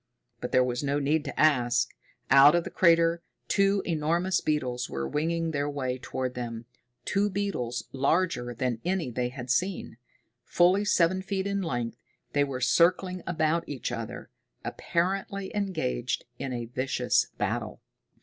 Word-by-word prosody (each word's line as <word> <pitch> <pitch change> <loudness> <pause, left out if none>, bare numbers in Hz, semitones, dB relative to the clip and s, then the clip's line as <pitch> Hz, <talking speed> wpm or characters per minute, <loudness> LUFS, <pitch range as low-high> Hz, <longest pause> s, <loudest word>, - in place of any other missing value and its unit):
But 125 - -5
there 130 -1 +5
was 125 0 -1
no 140 0 +1
need 145 +2 +1
to 140 - -5
ask. 125 -6 +3 0.4
Out 140 +3 +8
of 175 - +2
the - - -7
crater 170 -1 +4 0.3
two 195 0 +2
enormous 170 +3 +1
beetles 125 -5 -1
were 70 0 -3
winging 165 - -1
their 145 -1 -1
way 130 -3 -3
toward 130 0 -3
them, 115 -2 -5 0.4
two 205 +1 +1
beetles 155 - -3
larger 135 -2 +1
than 120 -1 -2
any 175 -6 -1
that - - -15
they 125 -1 0
had 125 -1 -5
seen. 180 -4 -1 0.5
Fully 185 +4 +3
seven 185 -1 +3
feet 190 0 -2
in 200 0 -1
length, 120 -9 -3 0.4
they 145 - +3
were 135 -2 -4
circling 180 +8 +3
about 165 -1 0
each 135 -3 -4
other, 115 -2 -6 0.3
apparently 195 +3 -2
engaged 155 - -1
in 135 - -3
a 120 -1 -3
vicious 130 +3 +1
battle. - - -2
150 Hz, 150 wpm, -28 LUFS, 125-180 Hz, 0.5 s, Out